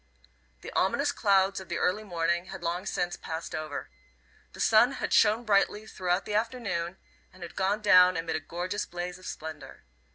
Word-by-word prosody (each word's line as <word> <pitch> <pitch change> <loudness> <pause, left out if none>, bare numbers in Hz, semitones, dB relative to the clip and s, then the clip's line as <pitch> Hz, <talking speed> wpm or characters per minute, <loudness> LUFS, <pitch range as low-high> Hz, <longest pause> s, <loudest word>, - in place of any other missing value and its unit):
The - - -8
ominous 280 +10 +1
clouds 195 -4 +2
of 190 - -11
the 170 - -2
early 190 +4 0
morning 170 -2 -1
had 190 -1 -9
long 175 +3 -2
since 175 0 -1
passed 160 +1 -6
over. 155 - -5 0.6
The - - -13
sun 230 +4 +5
had - - -3
shone 220 +2 +4
brightly 210 0 +2
throughout 180 -2 -1
the 210 - -4
afternoon, 210 -6 -2 0.3
and 185 - -12
had 170 - -9
gone 200 +3 0
down 185 -2 +6
amid 165 -1 -2
a - - 0
gorgeous 175 +6 -4
blaze 175 +1 -5
of 185 - -11
splendour. 155 -2 -8
185 Hz, 175 wpm, -28 LUFS, 170-210 Hz, 0.6 s, down